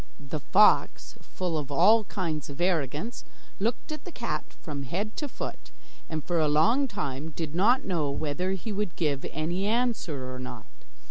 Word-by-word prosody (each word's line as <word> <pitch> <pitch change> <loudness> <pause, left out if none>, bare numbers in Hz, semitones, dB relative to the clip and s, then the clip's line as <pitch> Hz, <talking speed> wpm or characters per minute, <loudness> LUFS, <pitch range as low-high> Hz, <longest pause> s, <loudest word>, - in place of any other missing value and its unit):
The 145 +1 -4
fox, 200 - +4
full 175 -4 -2
of 145 -1 -6
all 215 +10 +6
kinds 160 -8 -3
of 140 - -8
arrogance, 175 - 0 0.4
looked 230 +9 -1
at 305 - -5
the 360 - -8
cat 235 - -2 0.2
from 145 -3 -5
head 190 +11 -3
to 295 - -1
foot, - - -6 0.4
and 155 -2 -3
for 175 -2 +1
a 155 - +3
long 225 - +4
time 150 - -3
did 160 -3 -3
not 240 +10 +4
know 160 -6 0
whether 155 +6 -1
he 195 +3 -4
would 205 -4 -2
give 145 -5 0
any 175 +6 -1
answer 210 - 0
or 125 - -6
not. 130 - -7
170 Hz, 175 wpm, -28 LUFS, 150-210 Hz, 0.4 s, all